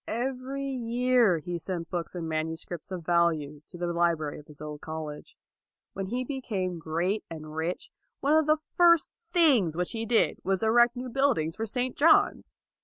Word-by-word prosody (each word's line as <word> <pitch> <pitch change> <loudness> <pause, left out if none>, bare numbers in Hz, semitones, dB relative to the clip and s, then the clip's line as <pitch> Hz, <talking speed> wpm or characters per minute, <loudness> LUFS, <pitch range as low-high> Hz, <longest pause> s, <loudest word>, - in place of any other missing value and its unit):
Every 260 +3 -3
year 245 -5 +2
he 175 +2 -4
sent 170 -1 -5
books 175 -1 -4
and 170 -2 -4
manuscripts 160 +1 -4
of 180 -3 -6
value 160 -4 +1
to 180 - -11
the 175 0 -2
library 170 -3 0
of 150 - -15
his 150 -1 -12
old 150 -1 -7
college. 155 -2 -7 0.6
When 195 0 -4
he 245 +5 -2
became 205 -10 -3
great 170 +6 -1
and 155 -2 -8
rich, 165 +3 -3 0.3
one 285 +2 +2
of 315 -1 +4
the 310 0 +4
first 340 +1 +3 0.2
things 255 - +4
which 180 0 -1
he 225 0 -3
did 230 0 +2
was 195 -1 0
to - - +1
erect 240 +2 +4
new 250 +1 -5
buildings 235 - +1
for 225 - -3
St. 250 +3 -1
John's. 320 +2 +4
185 Hz, 180 wpm, -28 LUFS, 165-250 Hz, 0.6 s, of